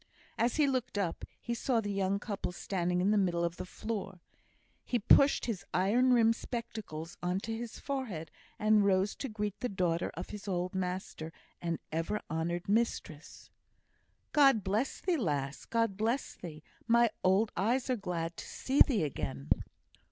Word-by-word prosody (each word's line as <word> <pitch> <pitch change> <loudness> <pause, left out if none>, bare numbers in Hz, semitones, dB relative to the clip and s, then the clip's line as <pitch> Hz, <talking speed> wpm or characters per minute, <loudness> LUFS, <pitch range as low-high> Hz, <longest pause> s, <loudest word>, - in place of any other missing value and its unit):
As 235 +1 +1
he 305 - +4
looked 260 -4 -1
up, 185 -5 -1
he 235 - -3
saw 235 0 +1
the 205 -2 -2
young 195 0 +1
couple 200 -3 -4
standing 180 0 -1
on 200 - +3
the 210 - +4
middle 175 -3 +1
of 170 0 -1
the - - -6
floor. 195 -3 -5 0.6
He 245 - 0
pushed 275 +6 +5
his 220 -7 -3
iron 230 +8 +4
rimmed 230 -2 +5
spectacles 220 -10 -6
on 180 +2 0
to 225 +1 -3
his 230 0 -6
forehead, 240 - -4 0.3
and 215 -1 +4
rose 195 +1 +3
to 270 - -4
greet 210 -2 -3
the 250 - -1
daughter 180 -3 0
of - - -6
his 210 -1 -8
old 180 0 -1
master 180 -3 -3 0.3
and 170 -1 -1
ever 165 +7 -1
honoured 170 +2 -2
mistress. 200 -8 -2 0.8
"God 275 -8 +5
bless 210 +7 -1
thee, 360 -3 +1
lass; 145 - -2
God 230 -4 0
bless 230 +5 0
thee! 155 -3 -9 0.2
My 235 -1 +5
old 195 +4 +3
eyes 235 +8 +1
are 255 - +2
glad 175 -5 -3
to - - -6
see 270 +2 0
thee 225 - +6
again." 75 - -4
200 Hz, 165 wpm, -32 LUFS, 175-230 Hz, 0.8 s, thee